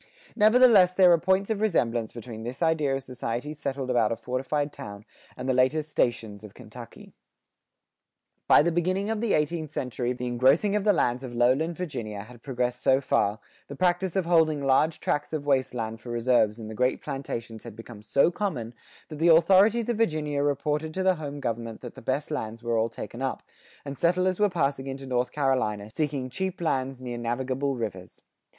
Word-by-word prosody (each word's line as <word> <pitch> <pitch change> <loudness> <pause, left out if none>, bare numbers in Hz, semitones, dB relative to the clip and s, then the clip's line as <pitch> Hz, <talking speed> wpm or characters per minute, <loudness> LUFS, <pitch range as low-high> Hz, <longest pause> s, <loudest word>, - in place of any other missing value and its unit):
Nevertheless 215 -4 +6
there 185 -2 +6
are 170 - +5
points 190 +4 +1
of 215 -1 -1
resemblance 120 - 0
between 115 -1 -9
this 125 +7 -4
idea 155 -4 +1
of 135 - -4
societies 130 +3 -5
settled 135 -3 -3
about 115 -3 +2
a - - 0
fortified 135 +5 -2
town 100 +1 -9 0.3
and 125 - -5
the 130 - +2
later 130 +5 +2
"stations" 115 -8 -2
of 105 - -12
Kentucky.[87:1] - - -12 1.3
By - - +7
the 170 - +1
beginning 185 +5 0
of 220 -1 -2
the 230 -3 +1
eighteenth 155 +1 0
century 125 -3 -3
the 125 0 -4
engrossing 135 - +3
of 210 - 0
the 210 - +6
lands 125 -8 0
of 120 -2 -7
lowland 135 +8 +2
Virginia 115 - -5
had 120 +1 -15
progressed 125 -2 -2
so 130 0 +4
far, 105 -5 0 0.3
the 140 - -8
practice 180 +3 0
of 190 -3 +1
holding 160 -4 +3
large 145 +4 +2
tracts 145 +2 -2
of 150 -2 -3
wasteland 125 -5 -1
for 120 - -10
reserves 120 -2 +2
in 110 - -7
the 110 - -7
great 125 +3 0
plantations 115 -6 -6
had 115 -3 -10
become 115 -1 -11
so 140 +10 +2
common, 145 - -3 0.4
that 155 -2 -8
the 165 - +3
authorities 195 +7 +5
of 240 -2 -1
Virginia 155 -9 0
reported 150 +2 -1
to 190 - -1
the 185 -1 +3
home 145 -1 -5
government 115 -3 -4
that - - -8
the - - -12
best - - -2
lands 110 +1 -4
were 120 -1 0
all 115 0 +1
taken 120 +2 -8
up,[87:2] 135 -1 -2 0.4
and 140 0 -5
settlers 180 +2 +1
were 210 0 +4
passing 140 -6 -1
into 135 0 -6
North 125 -1 -1
Carolina 110 -7 -1
seeking 140 -2 -2
cheap 190 +8 -4
lands 135 -5 -2
near 120 -1 -5
navigable 130 +3 -2
rivers. 100 -6 -6
135 Hz, 190 wpm, -26 LUFS, 120-165 Hz, 1.3 s, By